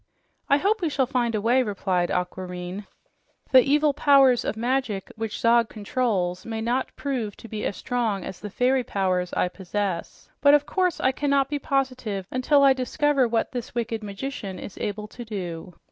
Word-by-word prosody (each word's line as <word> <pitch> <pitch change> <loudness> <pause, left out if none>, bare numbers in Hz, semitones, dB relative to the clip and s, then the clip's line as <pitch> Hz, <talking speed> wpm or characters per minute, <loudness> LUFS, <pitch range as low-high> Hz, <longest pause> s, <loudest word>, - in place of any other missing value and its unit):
"I 280 - +6
hope 405 +7 +1
we 335 - +1
shall 275 -2 +1
find 240 -2 0
a 210 - -1
way," 245 +4 +3
replied 190 -5 -1
Aquareine. 180 +1 -4 0.6
"The 260 -1 +9
evil 290 +2 +3
powers 275 -4 +5
of - - -3
magic 235 -4 -1
which 225 -1 -4
Zog 235 0 +4
controls 200 -5 -1
may 225 -1 -4
not 240 +4 -1
prove 245 -8 -3
to - - -11
be 215 -1 -5
as 195 - -5
strong 230 -6 -1
as 190 - -7
the 210 - -6
fairy 255 +5 +2
powers 185 -4 -1
I - - +1
possess, 190 -1 -4
but 285 +1 +7
of 295 0 +2
course 365 -3 0
I 260 - +3
cannot 280 0 +1
be 290 0 -2
positive 255 -8 -1
until 280 +3 +3
I 275 -1 +7
discover 265 +1 +1
what 225 -1 0
this 245 -2 -6
wicked 230 -1 -2
magician 200 -2 -5
is 195 - -8
able 210 +1 -3
to 240 - -9
do." 180 -6 -6
230 Hz, 180 wpm, -25 LUFS, 200-265 Hz, 0.6 s, The